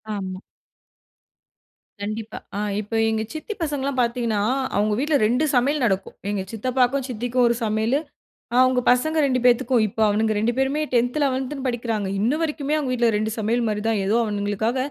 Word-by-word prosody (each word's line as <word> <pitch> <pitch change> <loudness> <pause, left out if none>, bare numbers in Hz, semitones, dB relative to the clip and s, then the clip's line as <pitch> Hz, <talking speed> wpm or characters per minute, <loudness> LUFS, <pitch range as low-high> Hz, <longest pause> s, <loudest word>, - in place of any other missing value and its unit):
ஆமா. 185 -1 -5 1.6
கண்டிப்பா, 215 +2 -5 0.2
அ - - -1 0.2
இப்போ 215 +2 -6
எங்க 220 0 0
சித்தி 315 +7 -5
பசங்கலாம் 280 -3 -2
பாத்தீங்கன்னா, 235 -3 0 0.3
அவுங்க 210 +1 +2
வீட்ல 295 +2 +1
ரெண்டு 250 +8 +2
சமையல் 270 +3 +2
நடக்கும். 195 -2 -1
எங்க 205 -2 -1
சித்தப்பாக்கும், 255 +3 0
சித்திக்கும் 245 +2 0
ஒரு 235 - +2
சமையலு, 220 +5 +1 0.5
ஆ - - 0
அவுங்க 255 -1 +2
பசங்க 315 +6 +1
2 255 -2 +1
பேத்துக்கும். 245 -1 +4
இப்போ 220 +3 -4
அவனுங்க 215 +1 +1
2 230 +3 +1
பேருமே 270 +3 +1
10, 245 +4 +2
11 265 +1 -2
படிக்கிறாங்க. 225 -5 -2
இன்ன 225 +7 +2
வரைக்குமே 300 -2 -1
அவங்க 280 -4 -2
வீட்ல 240 -2 +2
2 215 +1 -1
சமையல் 230 +2 0
மாரி 210 -1 -2
தான். 215 -3 +1
ஏதோ 215 +4 +2
அவனுங்களுக்காக 205 +3 -1
240 Hz, 160 wpm, -23 LUFS, 215-265 Hz, 1.6 s, பேத்துக்கும்